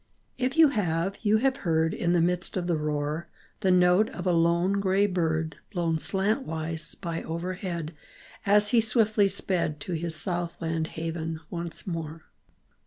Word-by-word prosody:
If 260 +4 -1
you 320 -2 +8
have, 190 - -1
you 215 -1 +3
have 265 +3 +1
heard 160 -2 +1
In 170 - 0
the 175 - +3
midst 180 +2 0
of 180 - -1
the 175 -1 +1
roar, 150 +1 -2 0.3
The 195 - +1
note 180 +3 +4
of - - -7
a 180 - +3
lone 170 +3 +2
gray 195 +1 +2
bird, 160 -4 -1
Blown 170 -4 0
slantwise 165 - -1
by 170 -3 -3
overhead 170 -1 -4 0.5
As 205 +1 +5
he 235 0 +4
swiftly 220 -2 +3
sped 180 -5 0
To 180 - -4
his 165 0 -2
south 175 +1 -1
land 160 -1 -2
haven 165 0 -3
once 170 -1 -5
more 165 -3 -5
175 Hz, 160 wpm, -27 LUFS, 165-195 Hz, 0.5 s, you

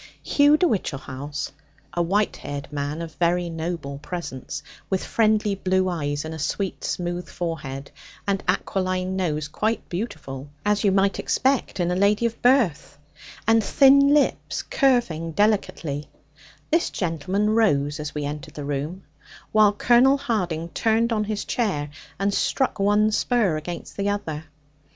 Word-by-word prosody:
Hugh 290 +1 +5
de 360 - +3
Whichehalse, 145 - -3 0.4
a 175 - 0
white 200 +5 +1
haired 145 0 -7
man, 145 +3 -3
of 160 -1 -8
very 175 0 +1
noble 160 -4 -4
presence, 150 -4 -6 0.3
with 190 -1 0
friendly 215 -2 +2
blue 185 -1 +1
eyes 145 -4 -2
and 160 - -5
a 160 - -7
sweet 190 +6 -2
smooth 175 0 -3
forehead, 140 -5 -5 0.3
and 195 -1 0
aquiline 185 0 0
nose 155 -5 -1
quite 215 +9 -1
beautiful 145 - -5 0.2
(as 210 -1 +2
you 200 - +4
might 195 +1 +2
expect 265 -6 0
in 175 0 +1
a - - +1
lady 205 +4 +3
of 230 -1 -2
birth), 240 - +2 0.5
and 225 -1 +5
thin 275 +5 +6
lips 295 -1 +1
curving 205 - +1
delicately, 170 -8 0 0.6
this 330 +2 +3
gentleman 185 +5 -1
rose 150 -11 +2
as 150 0 -5
we 150 -1 -2
entered 145 0 -6
the 145 - -5
room; 145 +6 -3 0.5
while 215 -1 +6
Colonel 245 +6 +4
Harding 180 - -2
turned 230 +4 +1
on 210 -1 0
his 210 0 -3
chair, 150 -12 -1 0.3
and 200 +1 0
struck 265 0 0
one 210 +2 +3
spur 215 -6 +2
against 170 +3 -6
the 200 0 0
other. 160 -7 -3
185 Hz, 145 wpm, -24 LUFS, 155-215 Hz, 0.6 s, thin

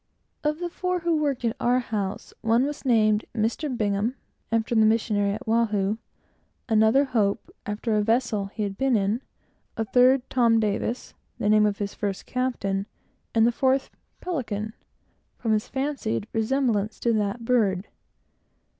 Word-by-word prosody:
Of 300 0 +1
the 350 +1 -3
four 365 0 -2
who 340 -1 +1
worked 275 -5 -1
at 230 - 0
our 245 +1 +3
house 210 -5 -3
one 230 +3 +3
was 295 +1 -5
named 215 -3 +3
"Mr. 225 +8 0
Bingham," 210 +3 0 0.4
after 230 +1 0
the 220 -1 +5
missionary 215 -2 +2
at 220 - -7
Oahu; 220 -2 +1 0.7
another, 220 +4 +4
Hope, 215 -6 0 0.2
after 210 +2 -2
a 210 - +3
vessel 225 -2 +1
that 195 - -12
he 215 - -1
had 195 -1 -4
been 265 -2 +3
in; 210 +3 +1 0.6
a 225 - 0
third, 250 +3 +4
Tom 235 -3 +3
Davis, 215 +3 -2 0.2
the 205 - 0
name 215 0 +5
of 205 -1 -1
his 200 -1 -3
first 200 -2 -3
captain; 205 -6 -1 0.5
and 225 0 +5
the 240 - +4
fourth, 265 +2 +1 0.3
Pelican, 220 - -3 0.6
from 225 - -1
his 215 -1 +1
fancied 265 -6 -2
resemblance 225 -2 0
to 235 - +1
that 215 +2 -1
bird. 205 -6 +2
225 Hz, 155 wpm, -25 LUFS, 210-250 Hz, 0.7 s, the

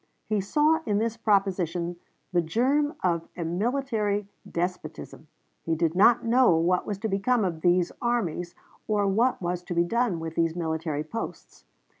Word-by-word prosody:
He 215 -2 0
saw 300 +10 +2
in 205 -1 +2
this 225 +1 0
proposition 185 -5 0 0.4
the 175 - +4
germ 265 - +1
of 170 -2 0
a 170 - -3
military 210 +1 -1 0.2
despotism. 170 -3 -5 0.3
He 165 - -1
did 165 0 +1
not 230 +6 +5
know 240 -5 +5
what 180 +2 +1
was 205 - -2
to - - +3
become 210 +3 +1
of 165 -3 -3
these 175 0 +3
armies, 180 -8 -1 0.3
or 210 -2 +1
what 225 +6 +2
was 175 0 -1
to 175 0 -6
be 170 - +4
done 230 -1 0
with 160 0 -5
these 165 0 0
military 160 -3 -2
posts. 225 +9 -7
185 Hz, 160 wpm, -26 LUFS, 170-230 Hz, 0.4 s, not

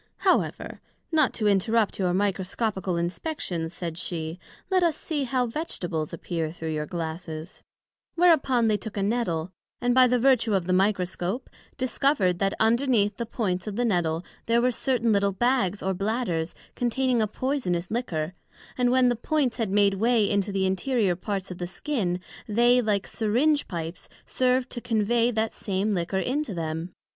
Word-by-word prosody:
However, - - +1 0.3
not 305 -5 +3
to 215 - 0
interrupt 210 +2 +2
your 180 -2 +2
Microscopical 190 0 -1
Inspections, 175 - -3
said 170 -2 -5
she, 165 -1 -4 0.3
let 370 -1 +4
us 335 -4 +2
see 295 -4 -2
how 255 0 +1
Vegetables 180 - -3
appear 165 -1 -3
through 160 -1 -4
your 150 0 -2
Glasses; 165 0 -5 0.5
whereupon 290 -9 +4
they 215 -1 +3
took 210 +1 -8
a 200 - +1
Nettle, 190 -6 -1 0.3
and 245 0 +2
by 255 0 +7
the 250 0 +2
vertue 235 -4 +3
of 185 -3 0
the 185 - +1
Microscope, 190 +3 0 0.3
discovered 255 -8 +1
that 195 0 +1
underneath 225 -3 +2
the 235 - -3
points 190 -5 -2
of 205 - -4
the 245 +2 +1
Nettle 175 -5 0 0.2
there 230 +1 +4
were 250 +1 +3
certain 240 -2 +1
little 200 -1 +2
bags 210 -3 +1
or 190 0 0
bladders, 195 -4 -1 0.2
containing 245 0 +1
a 215 - +2
poysonous 205 -8 -2
liquor, 180 -9 -2 0.5
and 245 -1 +3
when 255 0 +4
the 245 - +2
points 265 0 0
had 225 -4 -1
made 200 0 +4
way 225 +1 +2
into 200 0 0
the 195 -1 0
interior 195 0 +1
parts 195 0 -4
of 180 - -7
the 175 - -3
skin, 185 -3 -2 0.3
they 240 +3 +4
like 210 -4 0
Syringe 260 +8 +1
pipes 165 -1 -6 0.2
served 255 0 +1
to 240 - -4
conveigh 230 0 +2
that 220 -1 -1
same 200 +1 -1
liquor 180 +1 -1
into 255 +1 -1
them. 165 +1 -3
210 Hz, 165 wpm, -26 LUFS, 180-245 Hz, 0.5 s, by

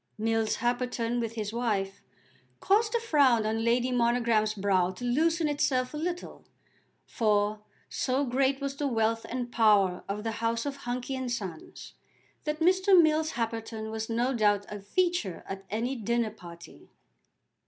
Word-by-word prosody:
Mills 225 0 0
Happerton, 240 0 -1
with 230 -1 -3
his 215 -2 -4
wife, 205 -5 -2 0.6
caused 430 +3 +2
the 470 - +2
frown 280 - +3
on 220 +1 -1
Lady 240 +2 +2
Monogram's 235 -3 +2
brow 190 -3 +2
to 185 +6 -7
loosen 320 +6 +2
itself 265 -3 0
a - - -4
little, 345 +3 -5 0.6
for, 210 -1 0 0.3
so 265 +2 -1
great 265 +2 +1
was 275 -1 -3
the 285 0 -1
wealth 225 -2 0
and 245 -1 -4
power 205 -6 +3
of 210 +1 -3
the 225 - -2
house 230 +1 0
of 285 -1 -3
Hunky 250 0 -4
and 260 -2 -3
Sons, 190 -9 -6 0.5
that 305 +1 -3
Mr. 370 +2 +5
Mills 315 -1 +3
Happerton 225 -1 -4
was 220 0 -4
no 240 +3 0
doubt 205 -3 +2
a 210 - -6
feature 220 - -1
at 195 0 -7
any 235 +5 -2
dinner 235 -1 -1
party. 170 -5 -13
235 Hz, 155 wpm, -28 LUFS, 215-270 Hz, 0.6 s, Mr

